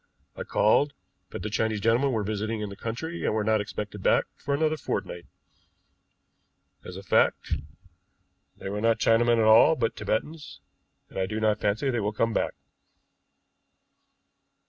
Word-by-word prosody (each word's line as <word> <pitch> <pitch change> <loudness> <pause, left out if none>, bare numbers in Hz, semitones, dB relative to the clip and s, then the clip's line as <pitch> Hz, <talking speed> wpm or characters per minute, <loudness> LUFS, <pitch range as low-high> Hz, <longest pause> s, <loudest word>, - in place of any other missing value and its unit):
I - - -7
called, 140 +7 +2 0.4
but - - -7
the 105 - -3
Chinese 110 -1 0
gentlemen 115 +6 +2
were 110 -4 -1
visiting 110 +2 -3
in 105 - -4
the 100 - -8
country, 160 +12 -5
and - - 0
were 110 - 0
not 110 0 +2
expected 105 -1 -6
back - - +3
for 140 - -2
another 155 +1 +1
fortnight. 90 - -5 1.6
As 90 - -9
a 100 - -9
fact, 95 - +1 1.0
they - - -8
were 105 +1 -3
not 115 0 +3
Chinamen 115 +1 +3
at 115 - +3
all, 110 +9 +6
but 115 -6 -1
Tibetans, 150 +7 -4 0.5
and - - -6
I 95 - 0
do 110 +2 -3
not 110 -1 +1
fancy 110 +7 0
they 120 - -1
will 105 0 -2
come 115 +1 0
back." - - -1
110 Hz, 160 wpm, -26 LUFS, 105-120 Hz, 1.6 s, all